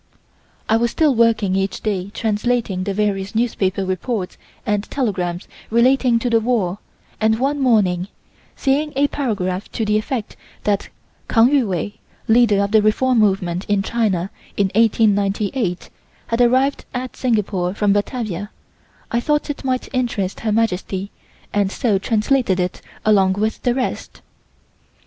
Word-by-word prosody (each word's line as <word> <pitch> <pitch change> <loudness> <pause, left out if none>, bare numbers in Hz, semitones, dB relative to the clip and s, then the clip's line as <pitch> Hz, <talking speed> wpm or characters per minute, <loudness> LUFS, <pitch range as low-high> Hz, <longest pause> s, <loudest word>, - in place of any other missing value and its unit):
I 220 - +3
was 235 +1 +1
still 300 +3 +2
working 225 -5 +2
each 195 0 -1
day 195 -3 -2
translating 220 -3 -1
the 200 - -1
various 200 -1 -1
newspaper 200 -4 0
reports 185 +1 -3 0.3
and 210 -1 -1
telegrams 185 -9 -2 0.2
relating 245 +1 +3
to 245 +2 -1
the 230 - +5
war 215 -5 0 0.4
and 220 0 +2
one 280 +4 0
morning, 200 -8 +2 0.5
seeing 290 +3 0
a 285 +1 +3
paragraph 200 -8 -2
to 225 - -1
the 210 0 +2
effect 225 0 -4 0.3
that 205 -1 0 0.4
Kang 230 +1 +5
Yu 270 -6 +3
Wei 190 +2 -3 0.3
(Leader 220 -3 +4
of 200 - -2
the 220 -1 +5
Reform 235 +4 +2
Movement 190 -4 +1
in 205 -1 +1
China 200 -5 0 0.3
in 195 -2 +1
1898) 205 -2 +1 0.3
had 230 +1 0
arrived 260 +3 +2
at 250 +1 -4
Singapore 205 -6 0
from 205 -1 +2
Batavia, 205 -2 -2 0.6
I 235 - +2
thought 295 +4 0
it 290 - -8
might 255 -1 -1
interest 230 -7 -1
Her 220 - -1
Majesty 200 -2 -1 0.4
and 200 -2 +1
so 215 -6 +1
translated 220 -1 +1
it 180 0 -2 0.2
along 195 -3 +4
with 215 +3 -2
the 245 -1 +1
rest. 260 -1 -4
215 Hz, 145 wpm, -20 LUFS, 195-240 Hz, 0.6 s, the